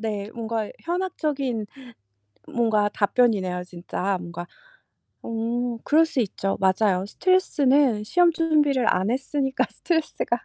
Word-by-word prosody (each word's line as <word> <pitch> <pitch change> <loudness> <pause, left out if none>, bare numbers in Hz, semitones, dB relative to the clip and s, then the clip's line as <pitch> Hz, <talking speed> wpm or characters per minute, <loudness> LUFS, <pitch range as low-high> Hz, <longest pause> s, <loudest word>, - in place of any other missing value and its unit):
네. 210 -2 -3
뭔가 225 -2 -3
현학적인 300 - -2 0.8
뭔가 220 -3 +2
답변이네요 200 -4 +1
진짜 180 +2 -3
뭔가. 175 0 -7 0.8
어 235 +1 -2
그럴 320 +2 +4
수 315 -4 -1
있죠. 195 -2 -2
맞아요. 190 0 +2
스트레스는 280 - +2
시험 350 +8 +3
준비를 300 -6 +2
안 185 +3 0
했으니까 270 +1 0
스트레스가 315 -7 -1
230 Hz, 270 characters per minute, -24 LUFS, 200-290 Hz, 0.8 s, 그럴